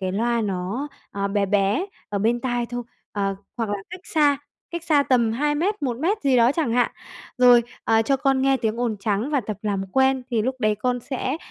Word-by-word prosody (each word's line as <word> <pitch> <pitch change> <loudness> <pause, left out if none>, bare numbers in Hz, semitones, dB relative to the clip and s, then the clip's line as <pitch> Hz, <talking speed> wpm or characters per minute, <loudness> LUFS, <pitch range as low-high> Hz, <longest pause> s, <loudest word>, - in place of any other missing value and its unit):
cái 185 -1 -2
loa 235 +3 +1
nó, 200 +7 -2 0.2
à, 200 0 -2
bé 200 0 +1
bé 205 - +1 0.2
ở 205 - -2
bên 230 +4 +1
tai 245 -2 -1
thôi. 245 0 -4 0.3
Ờ, 195 -1 -1 0.2
hoặc 230 -3 -2
là 205 - 0
cách 365 0 -7
xa, 290 -3 +2 0.3
cách 340 -1 -5
xa 300 -4 +4
tầm 240 -5 +2
2 295 +5 0
mét, 360 +4 -1
1 245 -4 -1
mét 370 +9 0
gì 270 -3 +3
đó 240 +2 +5
chẳng 295 -7 0
hạn. 245 +1 +2 0.5
Rồi, 245 -1 +7 0.2
à, 225 0 +3
cho 275 +5 +2
con 270 -1 +1
nghe 270 0 +4
tiếng 230 -2 -2
ồn 235 -3 0
trắng 210 +6 -1
và 285 -3 +2
tập 215 -2 -5
làm 200 -2 -1
quen 265 0 +3
thì 225 -3 +1
lúc 260 +2 -1
đấy 215 -1 +2
con 245 +3 -1
sẽ 260 +2 -3
240 Hz, 225 wpm, -23 LUFS, 215-270 Hz, 0.5 s, Rồi